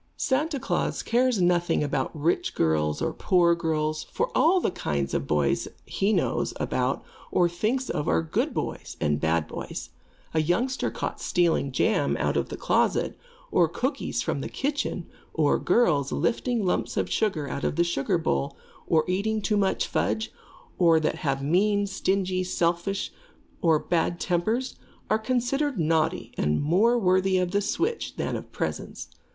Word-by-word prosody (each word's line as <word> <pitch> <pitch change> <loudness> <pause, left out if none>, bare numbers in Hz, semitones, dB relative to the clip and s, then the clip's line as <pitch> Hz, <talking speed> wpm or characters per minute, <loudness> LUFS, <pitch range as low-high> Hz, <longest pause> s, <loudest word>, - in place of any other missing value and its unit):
Santa 290 +2 0
Klaas 270 - -1
cares 245 -2 +2
nothing 175 -3 +2
about 135 -2 -1
rich 165 +4 0
girls 75 -1 +1
or - - -1
poor 175 -2 +3
girls, 155 -2 -1
for - - -2
all 355 +4 +5
the 340 - 0
kinds 70 - -2
of - - -1
boys 75 -2 +1 0.2
he 195 +2 0
knows - - 0
about - - -1 0.3
or 175 - +3
thinks 220 +10 -1
of 150 - -2
are 80 -1 +2
good 80 - -1
boys - - -4
and 75 0 +1
bad 80 -1 +1
boys. - - -6 0.4
A 160 - +3
youngster 235 - 0
caught - - -4
stealing 170 -6 +1
jam 130 - +1
out - - 0
of - - 0
the - - -5
closet, - - +1 0.4
or 175 -2 +4
cookies 255 - -2
from - - -2
the - - -4
kitchen, 280 - -2 0.3
or 150 -3 +3
girls 150 - +2
lifting 240 -2 0
lumps 180 - -1
of - - +1
sugar 180 -10 0
out 140 - -4
of - - 0
the 170 - +3
sugar 170 +1 0
bowl, 70 - -1 0.3
or 155 -1 +3
eating 205 +4 0
too 210 +1 0
much 195 -2 +1
fudge, 220 - -1 0.5
or 165 -3 +5
that 155 - -2
are 135 -2 0
mean, 200 +7 +2
stingy, 190 -1 0
selfish, 175 +2 -1 0.5
or 165 -2 +4
have - - -16
bad 170 0 +1
tempers, 220 +9 -1 0.3
are 215 - +3
considered 255 +4 0
naughty 160 -1 +1
and 75 +1 +1
more 205 +11 +3
worthy 185 -2 +3
of 180 -1 0
the 205 +1 +2
switch 415 - -2
than - - -2
of - - -7
presents. - - -4
180 Hz, 165 wpm, -26 LUFS, 155-220 Hz, 0.5 s, all